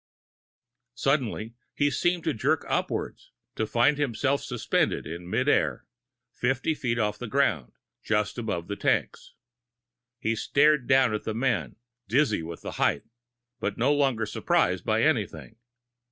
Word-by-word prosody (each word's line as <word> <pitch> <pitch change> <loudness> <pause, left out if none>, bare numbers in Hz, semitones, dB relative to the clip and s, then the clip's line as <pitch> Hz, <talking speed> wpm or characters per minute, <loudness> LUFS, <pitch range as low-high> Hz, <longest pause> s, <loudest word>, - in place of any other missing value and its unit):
Suddenly, 125 -5 -1 0.2
he 145 0 +2
seemed 175 +3 0
to - - 0
jerk 110 - 0
upwards, - - -2 0.3
to 110 - -1
find 120 +7 +3
himself 140 +1 0
suspended 125 -3 -1
in 85 +2 -7
mid - - 0
air, - - +1 0.5
fifty 135 +5 0
feet 120 -5 -2
off 105 -2 -1
the 125 - -5
ground, 105 - 0 0.3
just 105 -1 0
beyond 85 -6 -3
the 100 - -3
tanks. - - -1 0.8
He 115 -1 -1
stared 145 +3 +3
down 130 -4 +4
at 105 - -3
the 110 - -3
men, 120 -2 -1 0.3
dizzy 120 - +2
with 80 0 -8
the - - -5
height, - - +2 0.6
but 100 - -2
no 130 +5 +3
longer 135 -6 +1
surprised 105 - +1
by - - +1
anything. 110 - -1
120 Hz, 140 wpm, -27 LUFS, 105-140 Hz, 0.8 s, down